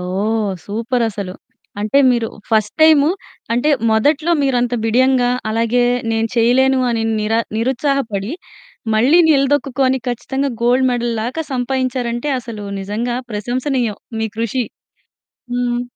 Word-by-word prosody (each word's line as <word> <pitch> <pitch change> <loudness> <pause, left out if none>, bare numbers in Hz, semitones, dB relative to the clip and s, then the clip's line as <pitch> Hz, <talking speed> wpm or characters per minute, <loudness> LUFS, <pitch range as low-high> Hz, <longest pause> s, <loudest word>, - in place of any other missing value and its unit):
ఓహ్! 205 +4 -1
సూపరసలు. 220 -3 -2 0.5
అంటే 215 +6 +2
మీరు 235 -2 0 0.2
first 215 -2 +1
time 310 -2 +6 0.4
అంటే, 245 +6 +1 0.2
మొదట్లో 290 +9 +2
మీరు 270 -2 +1
అంత 245 0 0
బిడియంగా, 250 +2 +3 0.2
అలాగే 230 +2 +1 0.3
నేను 225 0 0
చేయలేను 260 +3 +4
అని 230 -1 -1 0.2
నిరా 220 +2 +1 0.2
నిరుత్సాహపడి, 240 -3 -1 0.6
మళ్ళీ 260 +10 +4
నిలదొక్కుకొని 275 -2 +2
ఖచ్చితంగా 265 +3 -2
గోల్డ్ 250 +2 +3
మెడల్ 240 -1 -1
లాగా 255 +8 -3
సంపాదించారంటే, 250 0 -2
అసలు 225 -4 -8 0.2
నిజంగా 220 +5 -3
ప్రశంసనీయం. 240 +1 -2 0.2
మీ 220 - -1
కృషి. 230 +2 -1 0.9
హ్మ్. 245 0 0
240 Hz, 115 wpm, -18 LUFS, 225-265 Hz, 0.9 s, time